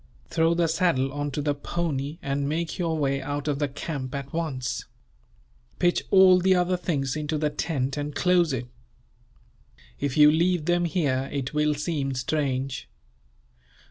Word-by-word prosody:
Throw 165 0 +3
the 170 -1 +2
saddle 160 -5 +1
on 145 0 -2
to 145 +1 -3
the 145 0 +1
pony, 145 -1 -3
and 140 +1 -1
make 165 +3 -2
your 165 -2 0
way 140 -2 0
out 145 +2 -4
of 145 -1 0
the 145 - +1
camp, 140 -1 -5
at 140 -1 -6
once. 130 -7 -3 0.9
Pitch 175 -1 +1
all 190 -1 +7
the 190 +1 +4
other 180 0 +2
things 140 -7 -2
into 150 0 -2
the 150 0 0
tent, 140 -3 -2
and 145 0 -4
close 180 -3 +3
it. 125 -2 -2 1.3
If 140 -1 -2
you 150 0 +8
leave 170 0 +1
them 175 0 +2
here, 140 -6 0
it 140 -1 -3
will 150 0 +2
seem 145 -3 -2
strange. 130 -1 -2
150 Hz, 160 wpm, -26 LUFS, 135-170 Hz, 1.3 s, you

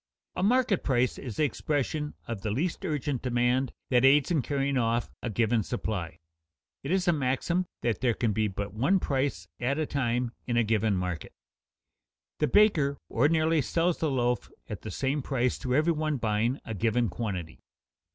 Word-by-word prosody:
A - - -2
market 235 -1 +2
price 125 -2 +1
is 120 -6 -6
the - - +1
expression 150 +1 -1
of 115 -4 -4
the 110 - -2
least 160 - -1
urgent 145 -6 -2
demand 125 +1 +1 0.2
that 125 -1 +4
aids 140 +3 +5
in 160 -5 +3
carrying 140 0 -1
off 120 -1 0
a 120 - -3
given 115 +1 +2
supply. 100 -6 -3 0.6
It 135 - -6
is 185 +1 +1
a 175 - +5
maxim 155 +6 0 0.2
that 115 -3 0
there 120 -3 +2
can 115 -3 0
be 110 +1 +1
but 100 0 -5
one 140 - +2
price 135 - -1
at 130 +4 0
a 155 - 0
time 125 -4 -1 0.2
in 120 -1 0
a 120 - +4
given 110 -1 +1
market. 90 -3 -3 1.1
The 150 - +2
baker 155 -10 +4
ordinarily 155 +5 +3
sells 165 +5 0
the 160 - +1
loaf 125 -2 0 0.2
at - - -6
the - - -6
same 140 +2 -1
price 125 -2 0
to 125 -2 -1
every 155 +4 +3
one 155 -1 -1
buying 115 +3 0
a 115 - -4
given 115 +3 +1
quantity. 90 -6 -4
130 Hz, 180 wpm, -28 LUFS, 115-150 Hz, 1.1 s, aids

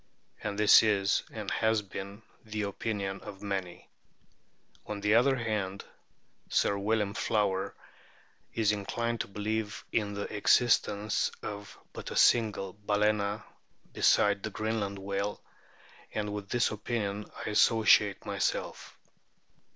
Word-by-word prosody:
And 100 -1 -3
this 105 0 +8
is 100 -3 +2
and - - -5
has 110 -1 +1
been 100 +2 -8 0.2
the 110 -1 -4
opinion 100 -1 -3
of 100 -2 -10
many. 95 -3 -4 1.0
On 105 -1 -4
the 105 +1 +2
other 130 +4 +5
hand, 105 -5 -3 0.6
Sir 100 - +2
William 105 0 0
Flower 100 -3 0 0.8
is 110 -2 +2
inclined 115 +3 -2
to - - -5
believe 105 +1 -3
in 105 -2 -1
the 100 - -3
existence 105 -1 +2
of 105 0 -7 0.2
but - - -7
a - - -6
single 105 -5 +3
Balccna 105 0 0 0.5
besides 100 -1 +3
the 110 - -3
Greenland 110 -2 -2
whale, 100 +1 -3 0.8
and 105 -1 -2
with 100 -1 -6
this 120 0 +1
opinion 105 -1 -3 0.2
I - - -2
associate 105 -2 +4
myself. - - -3
105 Hz, 120 wpm, -30 LUFS, 100-110 Hz, 1.0 s, this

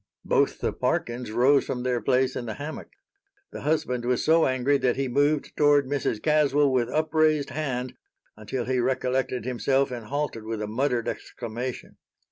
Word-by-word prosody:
Both - - +1
the - - 0
Parkins 120 -1 -2
rose 130 +5 +4
from 125 -1 -3
their 125 -1 0
place 130 0 +1
in 120 - -4
the 110 - -4
hammock. 150 +2 -7 0.6
The - - -7
husband 140 -5 0
was 125 0 0
so 160 +1 +4
angry 130 +2 +1
that 125 -2 +1
he 135 0 -1
moved 145 +4 +1
toward 145 -1 +4
Mrs. 135 -5 -1
Caswell 150 -2 +3
with 120 -2 +1
upraised 155 -1 +1
hand 130 -5 -3 0.4
until 115 +4 -4
he 130 0 0
recollected 130 -1 -1
himself 135 +2 +1
and 120 -3 -6
halted 145 -5 -3
with 110 0 -4
a 105 - -2
muttered 120 +1 -1
exclamation. 120 +1 -6
130 Hz, 165 wpm, -26 LUFS, 120-145 Hz, 0.6 s, rose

